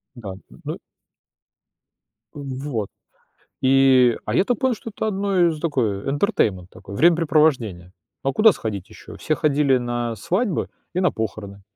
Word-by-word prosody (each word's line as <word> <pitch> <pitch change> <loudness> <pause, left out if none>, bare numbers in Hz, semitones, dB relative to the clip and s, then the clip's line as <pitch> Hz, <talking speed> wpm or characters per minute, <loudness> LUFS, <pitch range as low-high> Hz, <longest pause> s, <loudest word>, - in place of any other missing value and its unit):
Да, 110 -5 -8 0.2
н - - -17
ну - - -4 1.6
Вот. 135 -6 -4 0.7
И, 130 -2 +5
а, 105 - -2
я - - +4
так 245 0 -1
понял, 260 -2 +1
что 225 - -8
это 220 - -2
одно 195 -3 +2
из 160 -2 -2
такое, 125 - -1
э, - - -1
"интертеймент" 110 - 0
такой- 100 +1 -11
времяпрепровождение. 150 - +2 0.3
А 135 - +1
куда 215 +7 +6
сходить 100 - -5
ещё? - - -12
Все 155 - -1
ходили 145 -3 +2
на, 120 -1 -2
э, - - -8
свадьбы 185 - -1 0.2
и 180 - 0
на 180 -1 +2
похороны. 100 -2 -5
135 Hz, 155 wpm, -22 LUFS, 110-170 Hz, 1.6 s, куда